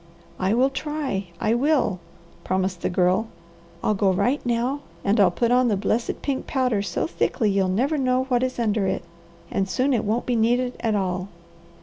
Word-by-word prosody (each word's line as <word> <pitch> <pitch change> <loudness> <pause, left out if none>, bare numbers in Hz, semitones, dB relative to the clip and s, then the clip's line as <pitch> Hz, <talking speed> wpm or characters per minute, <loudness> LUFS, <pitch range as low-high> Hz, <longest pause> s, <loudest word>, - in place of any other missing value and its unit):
"I 190 +4 +1
will 260 +3 +3
try! 270 - -3
I 220 0 +1
will!" 250 - +2 0.4
promised 185 -1 -1
the - - 0
Girl. 185 +4 +2 0.6
"I'll 215 - +2
go 195 -1 +2
right 250 +10 +1
now 245 +3 0 0.3
and 205 +3 +2
I'll 195 -3 +6
put 235 +7 0
on 250 0 +4
the 210 -4 +1
blessed 220 +4 -1
pink 275 -2 -2
powder 250 -6 +1
so 175 -4 -2
thickly 230 - 0
you'll 195 -1 +2
never 270 +11 +1
know 255 -1 +2
what 250 -2 0
is 255 0 -1
under 215 -4 +1
it, 190 - -1 0.5
and 195 0 -1
soon 260 +7 +1
it 230 -2 +1
won't 220 +3 -1
be 245 - 0
needed 245 +2 +2
at 220 -2 0
all." 185 -1 -1
230 Hz, 190 wpm, -24 LUFS, 195-255 Hz, 0.6 s, I'll